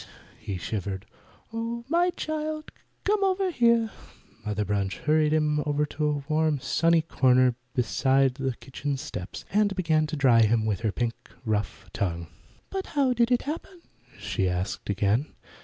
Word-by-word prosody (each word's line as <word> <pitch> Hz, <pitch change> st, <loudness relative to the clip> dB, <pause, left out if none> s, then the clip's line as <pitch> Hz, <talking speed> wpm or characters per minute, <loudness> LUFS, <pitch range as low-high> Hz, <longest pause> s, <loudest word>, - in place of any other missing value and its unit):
he 100 Hz, -, -4 dB
shivered. 95 Hz, 0 st, -4 dB, 0.5 s
"Oh, 230 Hz, +1 st, -3 dB
my 345 Hz, +4 st, +3 dB
child, 310 Hz, -2 st, -4 dB, 0.3 s
come 410 Hz, 0 st, +2 dB
over 380 Hz, -1 st, +1 dB
here!" 235 Hz, -5 st, +3 dB, 0.5 s
Mother 105 Hz, 0 st, -1 dB
Bunch 100 Hz, -1 st, -1 dB
hurried 155 Hz, 0 st, +2 dB
him 150 Hz, -1 st, +2 dB
over 150 Hz, 0 st, +1 dB
to 150 Hz, +1 st, -2 dB
a 145 Hz, -1 st, -1 dB
warm, 155 Hz, -1 st, +2 dB
sunny 160 Hz, +6 st, +2 dB
corner 130 Hz, -5 st, +4 dB, 0.2 s
beside 130 Hz, +2 st, +2 dB
the 130 Hz, -1 st, -2 dB
kitchen 140 Hz, +2 st, -4 dB
steps, 90 Hz, -7 st, -7 dB
and 205 Hz, -1 st, +3 dB
began 160 Hz, -4 st, +2 dB
to 150 Hz, -, -3 dB
dry 130 Hz, -5 st, +5 dB
him 110 Hz, 0 st, +3 dB
with 105 Hz, -3 st, 0 dB
her 110 Hz, -2 st, 0 dB
pink, 120 Hz, +2 st, -1 dB, 0.3 s
rough 105 Hz, -2 st, -2 dB
tongue. 85 Hz, -5 st, -2 dB, 0.5 s
"But 385 Hz, -1 st, -3 dB
how 265 Hz, -3 st, +4 dB
did 240 Hz, 0 st, +2 dB
it 245 Hz, -, +3 dB
happen?" 335 Hz, +4 st, -6 dB, 0.3 s
she 95 Hz, -1 st, -1 dB
asked 95 Hz, +3 st, -3 dB
again. 105 Hz, +7 st, +1 dB
145 Hz, 155 wpm, -27 LUFS, -, 0.5 s, dry